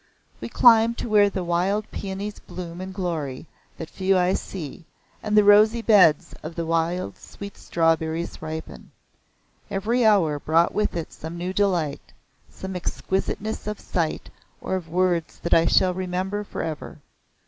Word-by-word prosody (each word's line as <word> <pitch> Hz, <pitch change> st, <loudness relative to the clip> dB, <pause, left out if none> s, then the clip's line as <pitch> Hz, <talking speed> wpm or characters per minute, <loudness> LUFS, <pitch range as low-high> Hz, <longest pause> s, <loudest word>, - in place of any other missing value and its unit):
We -, -, -6 dB
climbed 230 Hz, -1 st, +5 dB
to -, -, -4 dB
where 205 Hz, -1 st, +5 dB
the 190 Hz, -2 st, -4 dB
wild 185 Hz, +5 st, 0 dB
peonies 200 Hz, +1 st, -5 dB
bloom 175 Hz, -1 st, -8 dB
in 190 Hz, 0 st, -6 dB
glory 165 Hz, -8 st, -4 dB, 0.3 s
that 160 Hz, -, -6 dB
few 190 Hz, +2 st, +1 dB
eyes 180 Hz, +1 st, +1 dB
see, 170 Hz, -3 st, -8 dB, 0.4 s
and 210 Hz, 0 st, 0 dB
the 210 Hz, -, +7 dB
rosy 215 Hz, +3 st, +5 dB
beds 185 Hz, -10 st, +5 dB
of 160 Hz, +2 st, -8 dB
wild 165 Hz, -, -1 dB
sweet 200 Hz, 0 st, -10 dB
strawberries 165 Hz, 0 st, -1 dB
ripen. 160 Hz, 0 st, -7 dB, 0.8 s
Every 225 Hz, +5 st, 0 dB
hour 180 Hz, -9 st, +3 dB
brought 165 Hz, +3 st, +2 dB
with 210 Hz, -4 st, 0 dB
it 165 Hz, -, -5 dB
some 160 Hz, +2 st, -8 dB
new 180 Hz, +2 st, -3 dB
delight, 180 Hz, -8 st, -1 dB, 0.4 s
some 190 Hz, 0 st, -7 dB
exquisiteness 195 Hz, +4 st, -3 dB
of 210 Hz, -1 st, -3 dB
sight 165 Hz, -3 st, -3 dB, 0.3 s
or -, -, -4 dB
of 180 Hz, -4 st, -3 dB
words 175 Hz, -1 st, 0 dB
that 170 Hz, -, 0 dB
I 165 Hz, 0 st, +5 dB
shall 185 Hz, -1 st, +4 dB
remember 185 Hz, +3 st, -3 dB
for -, -, -5 dB
ever. 160 Hz, -2 st, -6 dB
185 Hz, 150 wpm, -24 LUFS, 165-205 Hz, 0.8 s, the